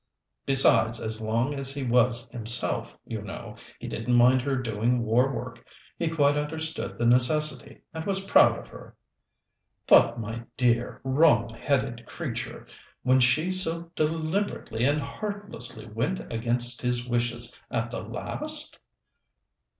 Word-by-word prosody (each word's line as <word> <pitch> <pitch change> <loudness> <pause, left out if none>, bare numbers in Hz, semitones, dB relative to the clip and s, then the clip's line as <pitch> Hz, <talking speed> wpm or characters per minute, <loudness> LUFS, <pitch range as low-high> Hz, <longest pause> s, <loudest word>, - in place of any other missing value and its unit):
Besides, 115 -4 +4
as 110 0 -3
long 115 +6 -1
as 135 -1 +1
he 140 - -3
was 120 -1 +2
himself, 115 0 +3
you 110 -2 -6
know, 100 -3 -9 0.2
he - - -8
didn't 120 +3 -2
mind 125 +2 +5
her 135 +1 -1
doing 120 0 -1
war 120 +4 +2
work. 130 - -7 0.3
He 170 - -2
quite 145 -3 +2
understood 160 +2 -4
the 120 - -1
necessity, 125 +6 +2
and 160 0 -5
was 195 -1 -1
proud - - +5
of - - -11
her." - - -13 0.9
"But, - - +5
my 115 +1 -5 0.2
dear, 120 -1 0
wrong 130 -4 +3
headed 120 -1 -2
creature, - - -6 0.4
when 130 +1 +3
she 155 +8 +2
so 170 -2 +2
deliberately 155 - -2
and 145 +2 +2
heartlessly 195 - -5
went 115 - -3
against 120 +1 +1
his 125 0 -1
wishes 120 0 -2
at - - -3
the - - -5
last?" - - -3
125 Hz, 135 wpm, -26 LUFS, 115-150 Hz, 0.9 s, mind